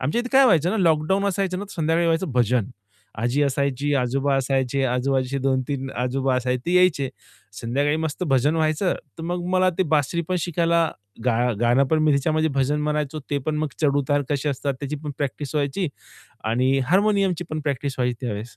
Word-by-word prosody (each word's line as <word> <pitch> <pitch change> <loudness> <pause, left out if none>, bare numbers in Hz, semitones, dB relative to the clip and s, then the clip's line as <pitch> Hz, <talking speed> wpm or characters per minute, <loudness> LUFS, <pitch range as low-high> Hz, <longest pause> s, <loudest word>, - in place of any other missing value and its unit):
आमच्या 145 - 0
इथे 245 - -5
काय 270 +1 +7
व्हायचं 175 - +4
ना, 220 - 0
लॉकडाउन 170 +2 +2
असायचं 190 -1 -1
ना. 205 - -4
तर 200 - -12
संध्याकाळी 165 +1 +1
व्हायचं 165 -3 0
भजन. 125 -1 +1 0.5
आजी 120 +6 +1
असायची, 140 0 0
आजोबा 135 +2 +1
असायचे, 135 0 0
आजूबाजूचे 130 +1 0
2-3 135 0 -1
आजोबा 130 +2 0
असायचे 125 0 -1
ते 175 - +1
यायचे. 165 -7 +3 0.5
संध्याकाळी 140 +6 0
मस्त 160 +2 -3
भजन 135 +4 +2
व्हायचं. 160 +3 +1 0.2
तर 165 - -6
मग 175 +1 -3
मला 185 0 +4
ते - - +4
बासरी 150 +4 +1
पण 185 - +1
शिकायला 170 0 +1 0.3
गा 120 -3 +2 0.2
गाणं 120 +3 +4
पण 160 - +3
मी 155 - +4
त्याच्यामध्ये 155 +3 +1
भजन 140 +2 +1
म्हणायचो, 150 0 -1
ते 145 - +1
पण 155 -1 0
मग 155 0 -1
चढ-उतार 145 -1 +2
कसे 145 0 0
असतात, 140 0 -2
त्याची 145 +1 -3
पण 150 - -3
प्रॅक्टिस 145 +1 -4
व्हायची 150 +5 0 0.6
आणि 125 +5 +2
हार्मोनियमची 195 +1 +2
पण 155 0 -2
प्रॅक्टिस 140 -2 -2
व्हायची 125 -1 +1
त्यावेळेस. 110 +1 -5
145 Hz, 180 wpm, -23 LUFS, 130-165 Hz, 0.6 s, काय